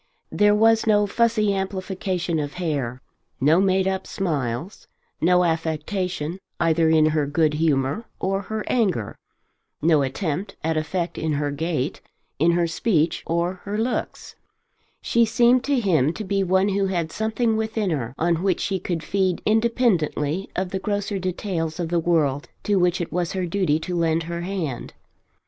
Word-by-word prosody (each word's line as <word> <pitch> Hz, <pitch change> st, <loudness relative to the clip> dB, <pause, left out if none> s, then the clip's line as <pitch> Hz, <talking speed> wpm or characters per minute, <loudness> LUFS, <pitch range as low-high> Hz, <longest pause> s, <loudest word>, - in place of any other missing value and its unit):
There 205 Hz, 0 st, +4 dB
was 225 Hz, +1 st, +4 dB
no 210 Hz, -1 st, +4 dB
fussy 215 Hz, -1 st, +2 dB
amplification 190 Hz, -3 st, -2 dB
of 145 Hz, -1 st, -4 dB
hair, 140 Hz, -8 st, -3 dB, 0.4 s
no 155 Hz, +6 st, +4 dB
made 190 Hz, -1 st, +2 dB
up 190 Hz, 0 st, -2 dB
smiles, 155 Hz, -, -3 dB, 0.3 s
no 180 Hz, +2 st, +4 dB
affectation 165 Hz, +1 st, -2 dB, 0.2 s
either 165 Hz, -1 st, +3 dB
in 160 Hz, -1 st, +5 dB
her 155 Hz, -2 st, 0 dB
good 150 Hz, +1 st, +2 dB
humour 150 Hz, -, 0 dB
or 195 Hz, +1 st, 0 dB
her 220 Hz, +1 st, -4 dB
anger, 190 Hz, -, 0 dB, 0.6 s
no 155 Hz, -2 st, +3 dB
attempt 160 Hz, +7 st, -3 dB
at 160 Hz, +1 st, 0 dB
effect 170 Hz, +3 st, -2 dB
in 160 Hz, -1 st, -1 dB
her 145 Hz, 0 st, -1 dB
gait, 155 Hz, -2 st, -2 dB, 0.4 s
in 170 Hz, +3 st, +4 dB
her 175 Hz, 0 st, +2 dB
speech, 165 Hz, -1 st, +1 dB
or 170 Hz, +2 st, -1 dB
her 205 Hz, +1 st, -3 dB
looks. 235 Hz, +3 st, -3 dB, 0.7 s
She 235 Hz, -, +3 dB
seemed 240 Hz, +3 st, +4 dB
to 280 Hz, -2 st, +2 dB
him 160 Hz, -, +2 dB
to 215 Hz, -, -5 dB
be 195 Hz, 0 st, 0 dB
one 190 Hz, +2 st, +2 dB
who 195 Hz, 0 st, +1 dB
had 170 Hz, -4 st, -2 dB
something 220 Hz, +1 st, 0 dB
within 220 Hz, -3 st, -1 dB
her 130 Hz, -5 st, -3 dB
on 170 Hz, 0 st, +1 dB
which 190 Hz, -2 st, +1 dB
she 195 Hz, -1 st, -1 dB
could 170 Hz, -2 st, -3 dB
feed 190 Hz, -3 st, 0 dB
independently 205 Hz, -, +1 dB
of 185 Hz, -1 st, -2 dB
the 190 Hz, -, -2 dB
grosser 205 Hz, 0 st, -2 dB
details 180 Hz, -3 st, -3 dB
of 170 Hz, -2 st, -2 dB
the 170 Hz, 0 st, +1 dB
world 160 Hz, -3 st, +1 dB
to 205 Hz, -1 st, +1 dB
which 180 Hz, 0 st, +2 dB
it 170 Hz, -, -4 dB
was 175 Hz, 0 st, -1 dB
her 185 Hz, -1 st, -1 dB
duty 175 Hz, -4 st, +1 dB
to 180 Hz, +2 st, -3 dB
lend 165 Hz, -1 st, +1 dB
her 170 Hz, +1 st, -4 dB
hand. 175 Hz, -9 st, -4 dB
180 Hz, 165 wpm, -23 LUFS, 160-200 Hz, 0.7 s, in